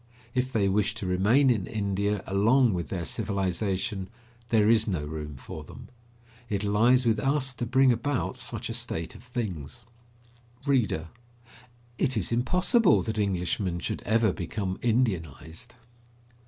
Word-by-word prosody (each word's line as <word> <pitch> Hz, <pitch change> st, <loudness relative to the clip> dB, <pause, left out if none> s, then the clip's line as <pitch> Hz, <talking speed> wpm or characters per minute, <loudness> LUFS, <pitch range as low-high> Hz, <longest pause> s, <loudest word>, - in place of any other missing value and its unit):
If 130 Hz, 0 st, 0 dB
they 105 Hz, -5 st, +2 dB
wish 105 Hz, +2 st, +1 dB
to 110 Hz, -4 st, -5 dB
remain 105 Hz, +10 st, +4 dB
in 105 Hz, -6 st, -1 dB
India 100 Hz, -1 st, -1 dB
along 110 Hz, +5 st, +3 dB
with 85 Hz, -2 st, -3 dB
their 90 Hz, -3 st, -3 dB
civilization, 95 Hz, +2 st, -1 dB, 0.4 s
there 110 Hz, -2 st, +4 dB
is 115 Hz, -1 st, +5 dB
no 90 Hz, -8 st, -1 dB
room 75 Hz, -1 st, -6 dB
for 65 Hz, -, -8 dB
them. -, -, -12 dB, 0.6 s
It 100 Hz, -1 st, -1 dB
lies 115 Hz, +5 st, +3 dB
with 110 Hz, -2 st, +2 dB
us 135 Hz, 0 st, 0 dB
to 120 Hz, -1 st, -4 dB
bring 130 Hz, +2 st, +5 dB
about 130 Hz, +1 st, -1 dB
such 120 Hz, -1 st, -4 dB
a 115 Hz, -, -4 dB
state 115 Hz, -9 st, -3 dB
of -, -, -13 dB
things. 115 Hz, -, -5 dB, 0.8 s
READER: 110 Hz, -, +1 dB, 0.9 s
It 130 Hz, -4 st, +1 dB
is 100 Hz, -1 st, -1 dB
impossible 180 Hz, -, +3 dB
that 110 Hz, -2 st, -3 dB
Englishmen 90 Hz, -2 st, -1 dB
should 85 Hz, -, -4 dB
ever 110 Hz, -2 st, +2 dB
become 95 Hz, +2 st, -4 dB
Indianised. 95 Hz, -, -1 dB
105 Hz, 140 wpm, -27 LUFS, 95-120 Hz, 0.9 s, is